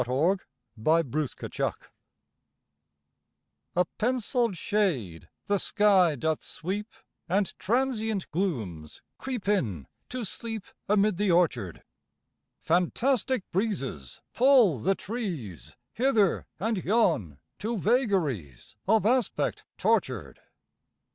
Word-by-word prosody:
By 130 - 0
George 130 - -12
Parsons 150 -2 -1
Lathrop - - -3 1.9
A 180 +1 +3
penciled 240 -3 0
shade 160 - -1 0.2
the 200 -1 +1
sky 190 -7 +4
doth 160 +3 -1
sweep, 200 +6 -4 0.4
And 195 +2 +1
transient 220 -2 0
glooms 110 - -3 0.2
creep 250 -7 -4
in 110 - 0 0.2
to 250 -1 -4
sleep 225 0 -4 0.2
Amid 205 -2 +3
the 205 0 +1
orchard; 145 - +1 0.8
Fantastic 230 +8 +1
breezes 170 - -2
pull 240 - +5
the 195 - +1
trees 175 - -5 0.2
Hither 225 -6 +2
and 215 -2 -1
yon, 110 - +2 0.2
to 225 +2 -2
vagaries 180 - 0
Of 220 0 +4
aspect 250 +2 +1
tortured. - - 0
195 Hz, 95 wpm, -28 LUFS, 145-220 Hz, 1.9 s, pull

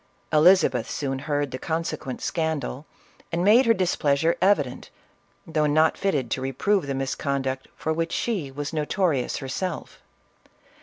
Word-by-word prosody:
Elizabeth 155 -7 +4
soon 135 -2 -2
heard 145 -1 -1
the 130 - -5
con 165 +3 -2
sequent 150 -5 -5
scandal, 160 -3 -2 0.4
and 170 +1 0
made 230 +6 +6
her 230 - +6
displeasure 160 -4 +1
evident, 170 -10 +1 0.6
though 155 -2 +1
not 155 +2 +3
fitted 140 - -1
to 130 - -1
reprove 140 +7 0
the 140 - -2
misconduct 135 0 -2
for 160 - -2
which 165 +1 -2
she 195 - -1
was 145 +3 -5
notorious 155 -3 0
herself. 165 +7 -5
150 Hz, 140 wpm, -25 LUFS, 135-170 Hz, 0.6 s, made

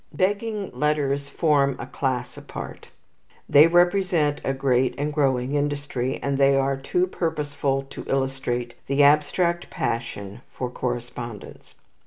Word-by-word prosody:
Begging 205 +1 -1
letters 145 -2 0
form 140 -3 +2
a - - -6
class 125 -2 -2
apart. - - -8 0.6
They 150 +3 +7
represent 175 -3 +2
a - - 0
great 130 -2 +1
and 150 +1 -2
growing 135 -3 +1
industry, 145 -3 -1
and 140 0 -1
they 140 0 +5
are 135 0 +2
too 155 +7 0
purposeful 145 -6 -1
to - - -7
illustrate 130 -3 -1
the 140 +1 +3
abstract 170 +4 +3
passion 115 -2 -4
for 125 -1 -4
correspondence. 120 -3 -6
140 Hz, 125 wpm, -24 LUFS, 130-150 Hz, 0.6 s, They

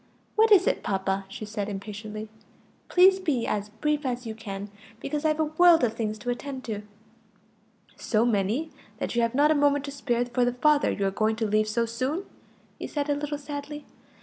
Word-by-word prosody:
"What 440 +1 +4
is 380 -2 +7
it, - - +1
papa?" 195 0 -1
she 205 +2 -7
said 210 -1 -4
impatiently. 215 +2 -6 0.6
"Please 375 +1 +6
be 290 -10 0
as 205 0 -2
brief 300 +7 -1
as 250 -2 -3
you 225 - -4
can; 200 -2 -7 0.3
because 300 +4 -3
I've 305 0 +2
a - - +4
world 325 +1 +5
of 225 -2 +2
things 215 -2 -3
to 245 +4 -3
attend 260 +1 -5
to." 210 -3 -4 1.2
"So 220 +1 +1
many 230 +8 0 0.3
that - - -3
you 235 - +3
have 230 +1 0
not 295 +2 +5
a - - +6
moment 285 -1 +2
to 280 - -5
spare 245 -3 -1
for 245 +1 0
the 245 0 +1
father 295 +4 +3
you 200 - -1
are 195 - +1
going 215 +2 +1
to 225 0 -1
leave 215 0 +2
so 230 +2 0
soon?" 260 +10 -2 0.6
he - - -4
said 290 -1 -2
a - - +2
little 290 0 -3
sadly. 290 0 -7
245 Hz, 200 wpm, -26 LUFS, 215-295 Hz, 1.2 s, is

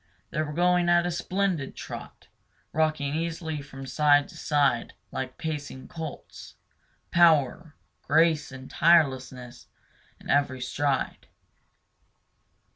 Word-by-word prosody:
They 155 - -1
were 150 -1 -3
going 175 +2 +2
at 175 0 +4
a 175 - -1
splendid 180 -4 -1
trot, - - -9 0.5
rocking 155 -2 0
easily 160 -1 -3
from 135 -1 -10
side 145 +2 +3
to - - -13
side 140 -5 +1 0.2
like 130 -1 -5
pacing 145 -4 -5
colts, 160 -3 -8 0.6
power, 160 -2 +3 0.3
grace, 155 - +2 0.2
tirelessness 130 -7 +2 0.5
in - - -14
every 140 -2 +1
stride. 135 +2 -2
150 Hz, 105 wpm, -27 LUFS, 140-165 Hz, 0.6 s, at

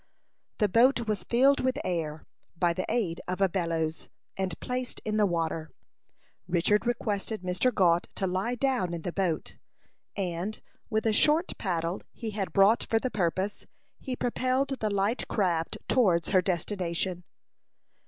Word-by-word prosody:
The 210 - +3
boat 235 +4 +4
was 205 -4 -1
filled 270 +4 +4
with 260 +1 0
air, 160 -3 -2 0.3
by 170 0 +2
the 185 - -3
aid 185 -8 -1
of 180 +1 -2
a 195 - +4
bellows, 165 -3 -2 0.3
and 190 -3 -3
placed 250 0 -3
in 215 0 0
the 210 -1 +4
water. 165 -2 -2 0.8
Richard 185 +6 +2
requested 220 -3 -2
Mr. 185 +8 +1
Gault 175 -5 +3
to 195 - -1
lie 190 +6 -1
down 245 -9 0
in 165 - -7
the 175 - -2
boat, 180 -5 -1 0.6
and, 185 +2 -3 0.3
with 220 0 0
a 220 - +3
short 310 - +3
paddle 170 -2 -1
he 225 -2 -5
had 200 -2 -3
brought 200 +3 +5
for 225 - +1
the 250 +3 -1
purpose, 190 +1 -1 0.3
he 260 -2 -4
propelled 255 +3 0
the 215 - 0
light 200 +4 0
craft 175 -6 0
towards 180 -10 +3
her 185 -2 +4
destination. 180 -1 -2
195 Hz, 155 wpm, -28 LUFS, 175-230 Hz, 0.8 s, brought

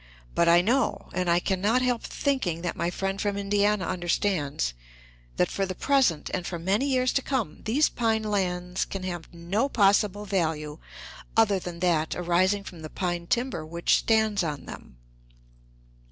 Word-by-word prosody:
But 170 0 +3
I 170 +1 +7
know, 245 +8 0
and 180 0 0
I 170 0 +4
can 185 +1 -1
not 230 +6 +2
help 245 -2 +1
thinking 195 - -1
that 175 - -2
my 170 - -1
friend 195 +2 -3
from 205 -1 -1
Indiana 205 0 +1
understands, 175 - -1 0.6
that - - +2
for 195 - -1
the 185 -1 -3
present, 255 - +2
and 180 - -1
for 175 - -3
many 195 +10 0
years 255 -2 +2
to 275 - +2
come, 245 - -2
these 275 +8 +3
pine 225 -2 0
lands 180 -3 -1
can 195 -1 -6
have 175 -3 -5
no 180 +10 -1
possible 205 -2 +3
value 160 -6 -1 0.6
other 205 -4 +4
than 175 -1 -7
that 165 -3 +1
arising 185 +3 +1
from 175 -4 -10
the 155 - -7
pine 175 -1 -3
timber 240 -8 -1
which 170 +2 +1
stands 220 -3 +2
on 150 -4 -4
them." - - -11
190 Hz, 170 wpm, -26 LUFS, 170-215 Hz, 0.6 s, I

